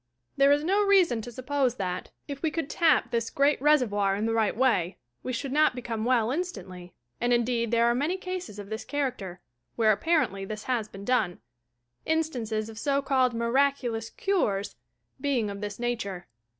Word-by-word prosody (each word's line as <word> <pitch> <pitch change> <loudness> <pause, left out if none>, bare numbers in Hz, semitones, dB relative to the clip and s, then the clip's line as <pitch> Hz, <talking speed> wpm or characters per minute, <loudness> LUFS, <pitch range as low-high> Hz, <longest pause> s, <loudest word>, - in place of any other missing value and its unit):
There 275 0 +5
is 290 +1 +3
no 390 +5 +2
reason 370 - +4
to 240 +2 -8
suppose 255 0 0
that, 180 -3 -4 0.2
if 280 -1 -6
we 320 - +1
could 305 -2 -3
"tap" 320 -5 +3
this 230 -1 -1
great 280 -1 +2
Reservoir 215 -10 +3
in 210 +2 -1
the 225 - 0
right 220 -2 +1
way, 220 -9 +2 0.2
we 255 - -4
should 255 +2 -3
not 300 -2 +3
become 230 -3 -4
well 240 -2 +2
instantly 185 - -5
— 120 - -45
and 240 0 +1
indeed 235 -1 +1
there 235 0 +3
are 235 - +4
many 295 +9 0
cases 365 - -6
of 205 0 -9
this 220 - -4
character, 245 -11 -3 0.3
where, 220 -2 +4
apparently, 215 - +1
this 215 +2 -6
has 240 -4 -1
been 200 -1 -10
done 200 -8 +1 0.3
— 120 0 -49
in 320 0 +3
stances 225 -8 -3
of 225 -1 -9
so 280 +1 0
called 260 -3 +2
"miraculous 235 -1 0
cures" 215 - -1 0.5
being 255 -7 0
of 200 0 -7
this 205 0 -5
nature. 225 -7 -3
240 Hz, 190 wpm, -27 LUFS, 210-280 Hz, 0.5 s, There